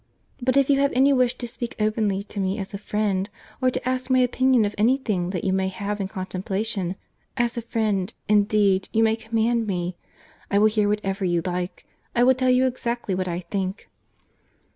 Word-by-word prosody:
—But 255 +2 +2
if 275 -1 +4
you 275 -1 +3
have 280 0 +3
any 270 +2 +4
wish 250 -1 +2
to 240 - -5
speak 235 +1 -6
openly 215 -2 0
to 210 0 -7
me 190 +1 0
as 195 -2 -5
a 200 - -4
friend, 205 -1 -1 0.3
or 255 - +4
to 250 - -4
ask 255 0 -1
my 260 - +4
opinion 255 -1 +3
of 205 - -2
any 235 +6 +3
thing 195 -9 -2
that 180 -3 -3
you 190 - +1
may 190 0 +1
have 200 +2 -3
in 195 - -2
contemplation—as 195 +4 -4
a 235 - -2
friend, 215 -5 -1 0.2
indeed, 205 -2 +3
you 225 - +3
may 220 0 +3
command 225 +1 0
me.—I 180 +1 -5
will 210 - +5
hear 210 -1 +1
whatever 195 -2 -1
you 175 -2 +1
like. 180 0 -4 0.3
I 240 - +4
will 260 +1 +6
tell 255 0 +1
you 255 +1 +4
exactly 240 -4 -2
what 185 0 -1
I 175 0 -2
think." 190 +2 -4
210 Hz, 195 wpm, -24 LUFS, 190-240 Hz, 0.3 s, will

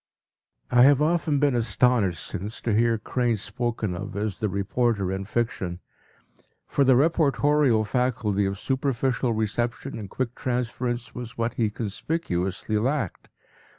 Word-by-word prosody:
p> 125 - +2
I - - +8
have 140 -1 +6
often 155 -1 +2
been 145 -1 +3
astonished 115 -5 +2
since 105 +5 -5
to 115 - 0
hear 115 +1 +3
Crane 120 +1 0
spoken 115 -2 -3
of 95 - -6
as 105 -2 -2
“the 105 - 0
reporter 100 0 0
in 95 +1 -3
fiction,” 95 -6 -2 0.9
for 140 - +1
the 130 -1 +5
reportorial 145 -4 +3
faculty 110 -4 0
of 100 0 -3
superficial 130 0 0
reception 115 +4 -2
and 100 -3 -7
quick 125 +1 -3
transference 120 -1 -2
was 120 -1 -7
what 115 0 -1
he 115 -4 +1
conspicuously 105 - -2
lacked. 130 - -2
120 Hz, 140 wpm, -25 LUFS, 105-130 Hz, 0.9 s, I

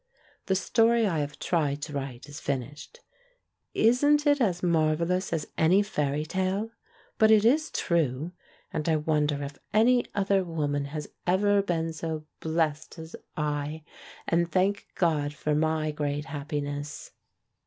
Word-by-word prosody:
The 190 - +2
story 230 +4 +3
I 170 -6 0
have 145 0 -3
tried 145 -4 0
to 150 - -5
write 135 -2 -5
is 145 +1 -8
finished. 145 - -5 0.7
Isn't 290 +6 +4
it 290 -1 +3
as 185 -6 +1
mar 160 -3 +3
vellous 180 +4 -1
as 165 -3 -1
any 180 +6 +5
fairy 150 -7 -1
tale? 190 +6 -1 0.5
But 220 - +6
it 220 -1 +6
is 305 +7 +3
true! 160 -2 0 0.4
And 155 +2 -1
I 160 - +4
wonder 150 -2 0
if 140 0 -7 0.2
any 245 +3 +4
other 195 -1 +2
woman 145 -4 -2
has 150 +1 -5 0.2
ever 200 +2 +3
been 165 -4 -1
so 160 -1 -4
blessed 160 -2 -1
as 160 0 -8 0.2
I, 150 0 -2 0.4
and 170 0 +1
thank 195 +2 +1
God 150 -4 +1
for 150 0 -1
my 155 0 +1
great 145 0 -2
happi 145 -1 -4
ness. 145 +1 -6
160 Hz, 150 wpm, -27 LUFS, 150-190 Hz, 0.7 s, But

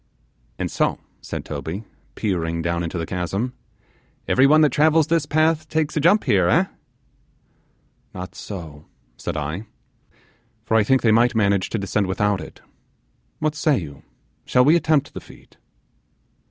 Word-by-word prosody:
'And - - -3
so,' - - 0 0.2
said - - -6
Toby, 80 +8 -5 0.3
peering 85 -5 -2
down 85 0 -1
into 85 +1 -4
the 85 - -2
chasm, 95 +8 -3 0.7
'everyone 140 +4 +5
that 150 - +4
travels 155 +1 +4
this 160 -1 0
path 155 0 +1
takes 160 -1 -1
a - - +2
jump 175 +8 +4
here, 95 -4 +3
eh?' - - +4 1.5
'Not 90 0 -8
so,' 80 -7 -9 0.3
said - - -5
I, 80 +9 -4 1.0
'for 110 - 0
I 110 - +5
think 130 +5 +2
they 115 - +4
might 120 +2 +3
manage 100 -3 +2
to - - -2
descend 100 0 -1
without 100 0 0
it; - - -11 0.8
what 155 0 -1
say 150 -2 +1
you, 75 -7 -7 0.4
shall 125 0 +3
we 155 +4 +6
attempt 155 -3 +1
the - - -7
feat? - - -18
110 Hz, 150 wpm, -22 LUFS, -, 1.5 s, we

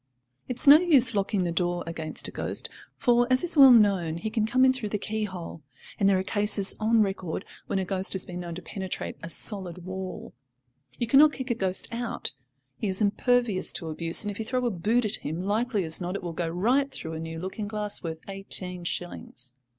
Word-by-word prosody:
It 250 - -3
is - - +5
no 290 +2 +10
use 275 -9 +4
locking 200 -1 0
the 175 - -1
door 175 0 -1
against 160 -1 -5
a - - -7
ghost, - - -2 0.3
for, 240 -1 +3
as 255 +3 +3
is 350 -1 +1
well 275 -3 +9
known, 195 -9 +4
he 215 +6 -4
can 220 -2 0
come 255 +3 +4
in 260 - +5
through 240 -5 -4
the 210 - -1
key 215 +1 -3
hole, 180 -4 -8 0.4
and 195 - +4
there 195 - +4
are 185 - -1
cases 205 0 +1
on 220 0 +3
record 190 -3 -4 0.2
when - - -1
a 190 - -1
ghost 190 0 -1
has 190 - +1
been 180 0 -7
known 170 -1 -6
to 180 - -8
penetrate 190 -2 -5
a 165 - -7
solid 180 -2 0
wall. 185 0 -6 0.6
You 240 - -1
cannot 280 +5 +6
kick 260 -1 -4
a - - +4
ghost 190 -4 -2
out; 235 -8 -3 0.4
he 215 - -2
is 190 -1 +1
impervious 220 -1 +1
to 165 - -3
abuse, 165 +4 +1
and 205 - -3
if 200 - -9
you 220 - -3
throw 250 +1 -1
a 240 - +1
boot 220 +6 +1
at 210 - -1
him, 160 +5 -5
likely 215 +1 0
as 160 +2 +3
not 180 +2 -3
it 200 - -5
will 170 -1 -4
go 165 0 -2
right 245 +11 +1
through 160 -10 -6
a 160 - -5
new 165 0 -6
looking 190 +5 -5
glass 210 -1 -2
worth 160 -1 -6
eighteen 185 -2 -3
shillings. 130 -8 -5
195 Hz, 225 wpm, -27 LUFS, 175-230 Hz, 0.6 s, no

